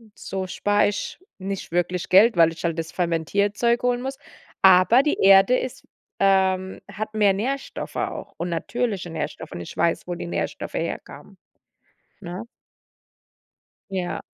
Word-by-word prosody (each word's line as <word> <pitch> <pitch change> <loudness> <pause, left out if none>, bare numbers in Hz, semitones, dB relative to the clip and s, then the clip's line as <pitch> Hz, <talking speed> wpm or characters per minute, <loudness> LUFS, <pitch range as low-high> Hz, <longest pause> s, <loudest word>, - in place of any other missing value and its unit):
So 190 -1 -5
spare 205 +2 +2
ich 205 - -5 0.2
nicht 195 -2 -5
wirklich 175 +1 -1
Geld, 205 +5 +6
weil 165 -1 +5
ich 165 - -10
halt 165 -1 -1
das 165 0 -4
Fermentierzeug 200 +8 0
holen 245 0 +1
muss. 270 +1 -4 0.5
Aber 190 +7 +7
die 295 - 0
Erde 195 +4 +7
ist 255 - -6 0.3
ähm, 190 -1 +2
hat 215 +2 -5
mehr 205 -2 +4
Nährstoffe 265 +8 -4
auch - - -4
und 170 +2 -3
natürliche 195 +2 -2
Nährstoffe, 160 - -5
und 85 - -6
ich 85 - -9
weiß, 170 +1 0
wo 175 - -3
die 175 - -6
Nährstoffe - - -4
herkamen, - - -6 0.8
ne? 180 +2 -6 1.5
Ja. 185 -2 -3
195 Hz, 140 wpm, -23 LUFS, 175-215 Hz, 1.5 s, Aber